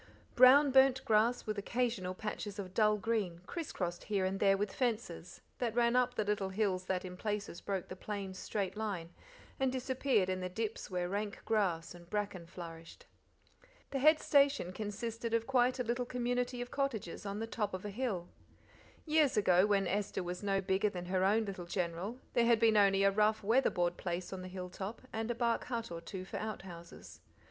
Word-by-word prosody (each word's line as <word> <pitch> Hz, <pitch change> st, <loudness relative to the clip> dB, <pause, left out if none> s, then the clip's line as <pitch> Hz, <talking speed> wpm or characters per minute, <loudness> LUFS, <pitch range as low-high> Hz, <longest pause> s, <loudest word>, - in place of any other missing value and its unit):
Brown 270 Hz, +3 st, +7 dB
burnt 265 Hz, 0 st, +5 dB
grass 225 Hz, +3 st, +3 dB
with 215 Hz, -1 st, -2 dB
occasional 200 Hz, -4 st, -1 dB
patches 210 Hz, 0 st, -5 dB
of 185 Hz, -2 st, -6 dB
dull 215 Hz, 0 st, +4 dB
green, 205 Hz, -6 st, -1 dB
criss 335 Hz, -, -5 dB
crossed 175 Hz, -2 st, -4 dB
here 200 Hz, -2 st, 0 dB
and 190 Hz, +1 st, -1 dB
there 195 Hz, -1 st, +4 dB
with 205 Hz, +1 st, -2 dB
fences; 220 Hz, -9 st, -3 dB, 0.2 s
that 235 Hz, -3 st, -1 dB
ran 240 Hz, 0 st, +3 dB
up 250 Hz, 0 st, +2 dB
the 215 Hz, -, +1 dB
little 205 Hz, -2 st, -1 dB
hills 190 Hz, -2 st, 0 dB
that 185 Hz, 0 st, -1 dB
in 180 Hz, 0 st, -7 dB
places 205 Hz, -3 st, -3 dB
broke 195 Hz, -3 st, -3 dB
the 185 Hz, -, -7 dB
plain's 195 Hz, -1 st, -5 dB
straight 195 Hz, -2 st, -2 dB
line, 195 Hz, -6 st, -4 dB, 0.5 s
and 265 Hz, -1 st, +2 dB
disappeared 260 Hz, -5 st, +1 dB
in 185 Hz, 0 st, -1 dB
the 185 Hz, 0 st, -3 dB
dips 220 Hz, +3 st, -4 dB
where 180 Hz, -2 st, -1 dB
rank 205 Hz, +2 st, -3 dB
grass 185 Hz, -7 st, 0 dB
and 175 Hz, -1 st, -14 dB
bracken 205 Hz, -5 st, -3 dB
flourished. 165 Hz, -2 st, -10 dB, 0.9 s
The 275 Hz, -, -1 dB
head 310 Hz, +3 st, +6 dB
station 280 Hz, -, +3 dB
consisted 230 Hz, +3 st, -3 dB
of 230 Hz, 0 st, 0 dB
quite 255 Hz, 0 st, +3 dB
a 250 Hz, -, 0 dB
little 240 Hz, +1 st, -1 dB
community 245 Hz, 0 st, -1 dB
of 245 Hz, -, -12 dB
cottages 265 Hz, -11 st, -2 dB
on 200 Hz, 0 st, -4 dB
the 225 Hz, -, -2 dB
top 225 Hz, -2 st, -2 dB
of 185 Hz, +1 st, -5 dB
a 205 Hz, -, -4 dB
hill. 200 Hz, -6 st, -2 dB, 0.8 s
Years 305 Hz, -5 st, +3 dB
ago, 185 Hz, -1 st, +5 dB
when 200 Hz, -2 st, +2 dB
Esther 190 Hz, 0 st, -1 dB
was 180 Hz, 0 st, -5 dB
no 195 Hz, -1 st, +1 dB
bigger 190 Hz, +2 st, +1 dB
than 180 Hz, -2 st, -6 dB
her 185 Hz, +1 st, 0 dB
own 215 Hz, +3 st, +3 dB
little 190 Hz, -3 st, -6 dB
General, 180 Hz, +5 st, -2 dB, 0.2 s
there 235 Hz, -1 st, +3 dB
had 235 Hz, -2 st, +5 dB
been 225 Hz, -1 st, +4 dB
only 195 Hz, -1 st, +5 dB
a 200 Hz, -, +5 dB
rough, 215 Hz, +2 st, +2 dB
red 200 Hz, -, -6 dB
weather 260 Hz, +4 st, +5 dB
board 175 Hz, -2 st, 0 dB
place 175 Hz, +1 st, -4 dB
on 190 Hz, -, -5 dB
the 185 Hz, -, -7 dB
hill 180 Hz, -1 st, -6 dB
top, 195 Hz, +5 st, -6 dB
and 225 Hz, +1 st, -2 dB
a 240 Hz, -, 0 dB
bark 235 Hz, -1 st, 0 dB
but 230 Hz, -5 st, -3 dB
or 165 Hz, 0 st, -5 dB
two 185 Hz, +1 st, -7 dB
for -, -, -6 dB
outhouses. 185 Hz, -6 st, -8 dB
205 Hz, 200 wpm, -34 LUFS, 185-235 Hz, 0.9 s, Brown